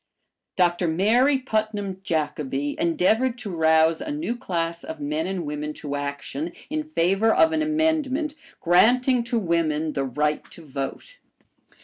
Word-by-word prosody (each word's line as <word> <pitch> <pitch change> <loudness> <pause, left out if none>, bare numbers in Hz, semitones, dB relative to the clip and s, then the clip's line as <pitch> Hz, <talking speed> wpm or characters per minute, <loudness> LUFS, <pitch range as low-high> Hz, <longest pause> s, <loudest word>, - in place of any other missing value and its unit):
Dr. 175 -1 +2
Mary 230 - +3
Putnam 215 -6 -2
Jacobi 145 -4 -2
endeavored 220 +9 +2
to 215 -5 -6
rouse 160 -1 +3
a - - -5
new 295 -4 -2
class 170 -8 -3
of 160 -1 -7
men 150 +3 -2
and 185 -3 -3
women 150 +1 -4
to 145 -2 -5
action 145 +3 -4 0.2
in 310 0 -1
favor 215 - +2
of 320 +7 +4
an 315 -1 0
amendment 310 -2 0 0.3
granting 245 +8 +4
to 240 0 -1
women 160 -5 0
the 140 - -1
right 150 +3 -1
to 165 - -13
vote. 140 - -6
175 Hz, 140 wpm, -24 LUFS, 155-250 Hz, 0.3 s, of